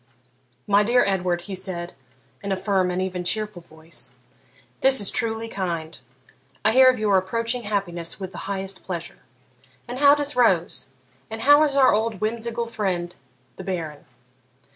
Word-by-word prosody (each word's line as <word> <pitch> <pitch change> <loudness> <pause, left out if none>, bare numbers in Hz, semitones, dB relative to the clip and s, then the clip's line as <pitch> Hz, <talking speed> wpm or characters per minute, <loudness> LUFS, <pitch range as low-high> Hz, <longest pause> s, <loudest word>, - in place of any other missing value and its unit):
'My 205 0 +4
dear 240 +4 +3
Edward,' 180 -3 0
he 195 +2 -7
said, 180 -2 -5 0.5
in 200 - -4
a 190 - 0
firm 190 -2 +1
and 180 0 -2
even 185 -1 -3
cheerful 210 0 -1
voice,'this 135 - -2
is 205 - +5
truly 225 -1 -1
kind. 170 -6 -4 0.7
I 220 - +4
heard 260 +1 +7
of 255 - -6
your 210 -3 +2
approaching 230 +5 -2
happiness 185 -4 -3
with 190 -1 -6
the - - -8
highest 195 -1 -3
pleasure. 170 -3 -6 0.7
And 245 +2 -5
how 285 0 +7
does 290 0 -2
Rose? 245 -2 +2 0.4
and 225 0 -6
how 290 +4 +6
is 280 -2 -1
our 270 -2 +5
old 220 -1 0
whimsical 235 +2 -2
friend 185 -6 -3 0.4
the 190 - -7
Baron? 165 -6 -5
195 Hz, 155 wpm, -23 LUFS, 175-230 Hz, 0.7 s, heard